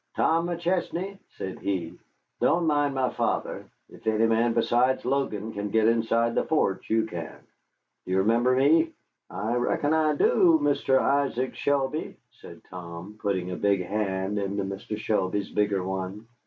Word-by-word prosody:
"Tom 165 +1 +2
McChesney," 175 +2 -2 0.2
said 95 - -5
he, 95 -5 -2 0.5
"don't 170 0 +2
mind 145 -2 +1
my 130 -1 +1
father. - - -2 0.2
If - - -14
any 110 +1 +3
man 115 +1 +2
besides 120 +3 +2
Logan 115 -5 -1
can 100 0 -3
get 110 +1 +3
inside 115 0 +2
the - - +1
forts, 100 -12 0
you 110 0 +2
can. 85 -6 -7 0.7
Do - - -6
you - - +2
remember 115 +6 +3
me?" 160 +5 +4 0.4
"I 110 +3 -3
reckon 125 +5 +1
I 155 -1 +2
do, 165 +2 +4
Mr. 145 -2 +2
Isaac 135 -2 +1
Shelby," 140 +1 -1
said - - -14
Tom, 90 +3 -9
putting 95 -3 -1
a - - -3
big 100 -2 +1
hand 100 0 -1
into 100 0 -2
Mr. 100 +2 -5
Shelby's 100 -2 -1
bigger 105 -2 +1
one. 95 +3 -4
115 Hz, 155 wpm, -26 LUFS, 100-140 Hz, 0.7 s, me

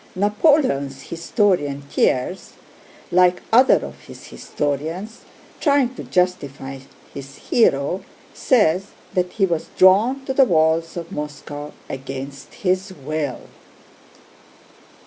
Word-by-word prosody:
Napoleon's 205 - +2
historian 165 -5 0
Thiers, 140 +5 -1 0.6
like 180 0 +3
other 255 +3 +5
of - - -10
his - - -12
historians, 160 - -4 0.4
trying 280 -4 +2
to - - -8
justify 140 -7 -2 0.3
his 135 0 -9
hero 175 - +1 0.3
says 195 -6 +2 0.3
that 180 -1 -1
he 195 - +2
was 170 -3 -2
drawn 225 +9 +4
to 265 - -2
the 270 - +6
walls 165 -3 +1
of 170 -1 -6
Moscow 145 0 -6 0.2
against 135 +1 -7
his 185 +2 +1
will. 150 -4 -4
170 Hz, 105 wpm, -21 LUFS, 145-205 Hz, 0.6 s, the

